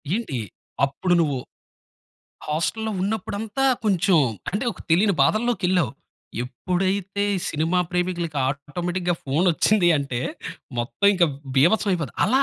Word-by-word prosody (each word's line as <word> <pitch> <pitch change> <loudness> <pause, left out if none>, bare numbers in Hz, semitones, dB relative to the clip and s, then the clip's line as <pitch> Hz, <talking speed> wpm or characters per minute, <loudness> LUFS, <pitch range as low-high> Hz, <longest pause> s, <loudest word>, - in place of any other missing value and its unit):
ఏంటి 215 - -3 0.5
అప్పుడు 175 +7 -1
నువ్వు 145 -4 0 1.1
హాస్టల్‌లో 220 +9 -1
ఉన్నప్పుడంతా 210 +4 -2 0.2
కొంచెం 185 -3 +3 0.3
అంటే 205 +7 -2
ఒక - - -15
తెలియని 195 +4 +4
బాధల్లోకేళ్ళావు. 190 -6 +2 0.5
ఎప్పుడైతే 190 +8 -1
ఈ - - -1
సినిమా 165 +4 0
ప్రేమికులకి 175 -3 -1
ఆటోమేటిక్‌గా 175 +6 -2
ఫోన్ 145 +6 +1
ఒచ్చింది 190 +2 +3
అంటే, 135 -4 -3 0.6
మొత్తం 120 +11 0
ఇంకా 180 -2 +4 0.3
బీభత్సం 195 +8 +4
అయిపోతది. 160 -8 -3
అలా 260 +6 +3
180 Hz, 110 wpm, -23 LUFS, 155-200 Hz, 1.1 s, తెలియని